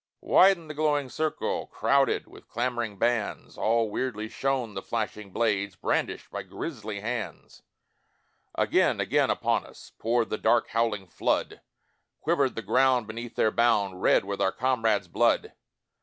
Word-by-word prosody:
Widened 185 -4 +4
the 155 - -6
glowing 145 -3 0
circle 155 +4 -2
Crowded 140 0 +1
with - - -16
clamouring 120 -3 -2
bands, 120 0 -1
All 115 -1 +1
weirdly 110 -3 -3
shone 130 -5 -1
the 95 - -4
flashing 105 -2 -4
blades 100 -2 0
Brandished - - -2
by - - -4
grisly 110 -9 -6
hands; 115 0 -5 0.9
Again, - - +2
again - - +2
upon - - +1
us, - - -14
Poured 115 0 0
the 110 - -2
dark 120 - +2
howling 110 -3 0
flood, 90 - -1 0.6
Quivered 145 -5 +1
the 115 - -4
ground 125 +3 +3
beneath 115 +2 -7
their 110 - +2
bound, 100 -6 +1
Red - - +4
with 100 0 -4
our 95 - +3
comrades' 115 -6 +1
blood. - - +1
115 Hz, 140 wpm, -27 LUFS, 105-130 Hz, 0.9 s, Widened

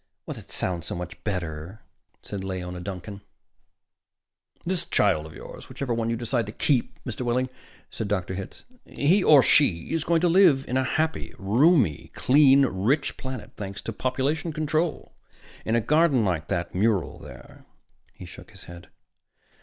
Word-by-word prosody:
"That - - -8
sounds 85 -2 -2
so - - -4
much 90 0 -8
better," 90 0 -5 0.4
said 100 -2 -5
Leora 90 -2 -5
Duncan. 100 +1 -7 1.4
"This 180 0 +2
child 80 0 +1
of 80 - -13
yours - - -11
whichever 135 -4 -3
one 115 0 -1
you 115 - 0
decide 120 -1 -1
to - - -5
keep, 130 +3 0
Mr. 120 -2 -6
Wehling," 125 +1 0 0.4
said 110 - -4
Dr. 95 -3 -2
Hitz. 95 +1 -8 0.2
"He 180 +8 +1
or 145 -4 +7
she 95 - +3
is 165 -2 0
going 165 0 +2
to 175 - +3
live 165 -6 +4
on 125 - -3
a 130 - +2
happy, 155 +4 -2
roomy, 115 - +2
clean, 140 0 +5
rich 120 +7 0
planet, 130 -3 -7
thanks 100 0 -6
to 115 - -5
population 140 +7 -1
control. 155 +2 -2 0.5
In 110 - +1
a 120 - +3
garden 145 -2 +3
like 85 -5 -1
that 85 -3 -3
mural 100 -2 0
there." - - -13 0.4
He - - -12
shook - - -12
his - - -11
head. 85 0 -12
115 Hz, 160 wpm, -25 LUFS, 95-145 Hz, 1.4 s, or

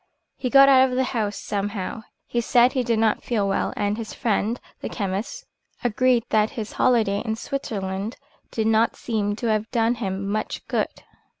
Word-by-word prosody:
He 255 - -3
got 275 +1 +8
out 265 -1 +6
of 250 - -3
the 260 - +2
house 220 -5 -2
somehow. 200 +1 -3 0.2
He 240 - -1
said 240 +2 +4
he 260 - +1
did 235 -2 0
not 220 -1 +2
feel 215 -5 0
well, 195 - 0
and 205 +1 0
his 225 -1 -6
friend, 225 0 0 0.2
the - - -5
chemist, 210 - -4 0.4
agreed 245 +1 +2
that 215 0 +3
his 220 -1 -4
holiday 220 -5 +2
in 220 -2 -2
Switzerland 205 -5 -4 0.3
did 220 - -2
not 225 +1 +3
seem 205 -3 -1
to 235 - -5
have 215 +1 0
done 230 0 +2
him 195 -4 -3
much 215 +2 -3
good. - - 0
220 Hz, 180 wpm, -24 LUFS, 205-245 Hz, 0.4 s, got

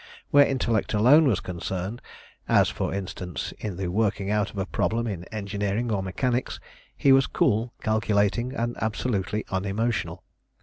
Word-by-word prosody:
Where 145 0 +7
intellect 115 -5 0
alone 140 +9 +6
was 110 -8 +1
concerned 95 +5 -4 0.5
as, - - +5
for - - -3
instance, 95 -2 -5
in 100 -5 -5
the 95 - -3
working 100 0 0
out 105 0 +1
of - - -12
a 95 - -1
problem 115 +4 -1
in 95 -6 -4
engineering 105 +2 -2
or 100 -3 0
mechanics 120 +7 -1 0.4
he 135 - +4
was 135 0 +5
cool, 115 +3 +1
calculating, 110 +2 +1
and 120 -2 -2
absolutely 105 -2 -1
unemotional. 100 +5 -2
105 Hz, 145 wpm, -26 LUFS, 100-120 Hz, 0.5 s, Where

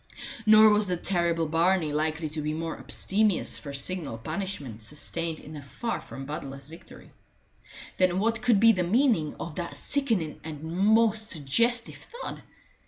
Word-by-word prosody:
Nor 215 0 +8
was 210 -1 +2
the 180 -1 0
terrible 170 -3 0
Barney 165 0 +1
likely 155 +1 -1
to 155 +1 -4
be 150 +1 -2
more 165 0 -4
abstemious 205 0 0
for 140 - -8
signal 140 -2 -2
punishment 150 - -5
sustained 155 +6 0
in 155 - -11
a 145 - -7
far 140 - -4
from 135 - -9
bloodless 140 -2 -7
victory. 165 +2 -14 0.9
Then 185 -1 +2
what 225 +3 0
could 240 -4 +3
be 230 +2 +7
the 185 -5 0
meaning 185 - +2
of 165 - -6
that 175 -2 -5
sickening 225 - -1
and 155 -2 -7
most 215 +6 +2
suggestive 230 - 0
thud? 480 +1 -8
170 Hz, 155 wpm, -27 LUFS, 150-215 Hz, 0.9 s, Nor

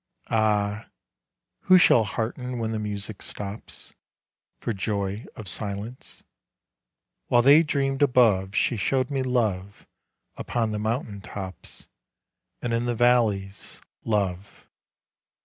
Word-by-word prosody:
Ah! 105 -1 +1 0.8
who 185 - +7
shall 120 -9 +6
hearten 125 +4 -4
when 115 -1 -2
the 110 - -2
music 105 0 -4
stops, 100 +1 -7 0.7
For 115 - -2
joy 100 +1 -3
of 110 - -8
silence? 105 +5 -2 1.0
While 120 0 +4
they 145 +5 +8
dreamed 140 -3 -1
above 110 -8 +3
She 120 - +1
showed 130 +5 0
me 135 -1 0
love 105 -7 -1 0.5
upon 115 -2 -2
the 105 - -3
mountain 110 -2 -3
tops 95 -2 -8 0.8
And 120 -1 -1
in 115 +1 0
the 120 -1 -1
valleys, 110 -5 +1 0.2
love. 100 -3 -2
110 Hz, 115 wpm, -25 LUFS, 100-125 Hz, 1.0 s, they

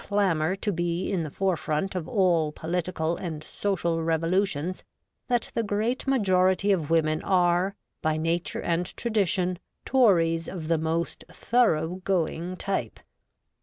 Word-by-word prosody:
25 - - -24
clamour 185 -4 +2
to 205 +1 -2
be 175 +1 -1
in 190 -4 0
the 155 - -4
forefront 185 +1 -1
of 180 -3 -4
all 175 -8 +2
political 170 0 -2
and 160 -4 -5
social 170 -3 -1
revolutions, 165 +1 0 0.4
that 245 -2 0
the - - +1
great 220 +5 -1
majority 190 -5 +3
of 165 -6 0
women 155 -1 +2
are, 180 +1 +2 0.3
by 155 0 +1
nature 165 +2 -1
and 175 +1 -1
tradition, 190 -5 0 0.3
Tories 170 -10 +3
of 165 -4 -6
the 165 -2 +2
most 165 +1 -2
thorough 185 -7 +1
going 180 -1 -1
type. 190 - -3
175 Hz, 135 wpm, -26 LUFS, 165-195 Hz, 0.4 s, majority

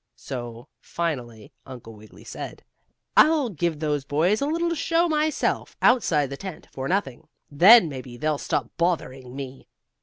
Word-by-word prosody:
So 120 - -7
finally 125 -10 -5
Uncle 120 -4 -11
Wiggily 105 0 -16
said: - - -8 0.5
"I'll 305 -5 +5
give 170 -4 -2
those 150 -2 -1
boys 165 - +1
a 280 - 0
little 335 +2 0
show 335 +2 +1
myself, 310 -1 -1
outside 160 - +3
the 140 - -5
tent, 190 -1 -8
for 130 0 -5
nothing. 175 -10 -2 0.2
Then 185 +7 +8
maybe 130 -4 -8
they'll 150 +1 -1
stop - - -2
bothering 135 -7 -2
me." 135 -1 -8
150 Hz, 145 wpm, -24 LUFS, 130-210 Hz, 0.5 s, Then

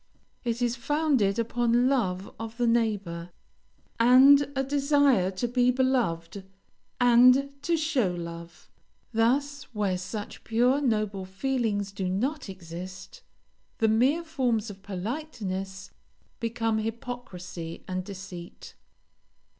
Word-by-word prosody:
It 235 0 -1
is 240 0 +1
founded 265 -6 +1
upon 240 +1 +2
love 195 -8 0
of 225 0 -7
the 245 - +1
neighbor, 205 -8 0 0.7
and 270 +4 +7
a 270 - +1
desire 280 -7 +3
to 195 +6 -2
be 245 +1 +2
beloved, 240 -9 0 0.6
and 250 +3 +6
to 340 +1 +1
show 305 - +1
love. 170 -1 -8 0.4
Thus, 270 +5 +1
where 195 -3 0
such 200 +3 -6
pure, 245 +5 +2
noble 210 -6 0
feelings 205 -1 -1
do 195 -2 -3
not 255 +7 -2
exist, 185 +1 -9 0.6
the 225 - +2
mere 260 +10 +3
forms 245 -9 -1
of 195 -1 -13
politeness 195 - -5 0.5
become 225 -1 -1
hypocrisy 215 -7 -6
and 185 0 -3
deceit. 185 -3 -9
225 Hz, 110 wpm, -27 LUFS, 190-260 Hz, 0.7 s, and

